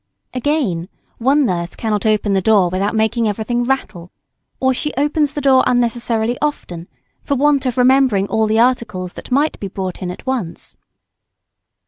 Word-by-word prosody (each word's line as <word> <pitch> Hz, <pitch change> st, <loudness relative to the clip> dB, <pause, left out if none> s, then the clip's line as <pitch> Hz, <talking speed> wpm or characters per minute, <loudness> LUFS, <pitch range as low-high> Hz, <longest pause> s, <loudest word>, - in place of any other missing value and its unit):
Again, 255 Hz, -, -1 dB, 0.3 s
one 275 Hz, +4 st, +3 dB
nurse 170 Hz, -4 st, -2 dB
cannot 215 Hz, -2 st, -1 dB
open 210 Hz, -1 st, +1 dB
the 190 Hz, -, +2 dB
door 200 Hz, -3 st, +3 dB
without 195 Hz, +4 st, -1 dB
making 220 Hz, +1 st, +1 dB
everything 230 Hz, +4 st, -1 dB
rattle. 205 Hz, -10 st, -3 dB, 0.5 s
Or 260 Hz, 0 st, +2 dB
she 300 Hz, +4 st, -2 dB
opens 295 Hz, 0 st, +1 dB
the 295 Hz, -, -3 dB
door 265 Hz, -2 st, +4 dB
unnecessarily 235 Hz, -1 st, 0 dB
often, 180 Hz, -, -3 dB, 0.3 s
for 280 Hz, -, -1 dB
want 280 Hz, -1 st, +2 dB
of 250 Hz, -, -2 dB
remembering 250 Hz, -5 st, +3 dB
all 220 Hz, +1 st, +1 dB
the 215 Hz, +1 st, +1 dB
articles 225 Hz, -7 st, 0 dB
that -, -, -10 dB
might 285 Hz, +4 st, +1 dB
be 200 Hz, -, -4 dB
brought 190 Hz, -1 st, -5 dB
in 180 Hz, -, -3 dB
at 180 Hz, -, -8 dB
once. 245 Hz, -11 st, -4 dB
230 Hz, 160 wpm, -18 LUFS, 195-265 Hz, 0.5 s, door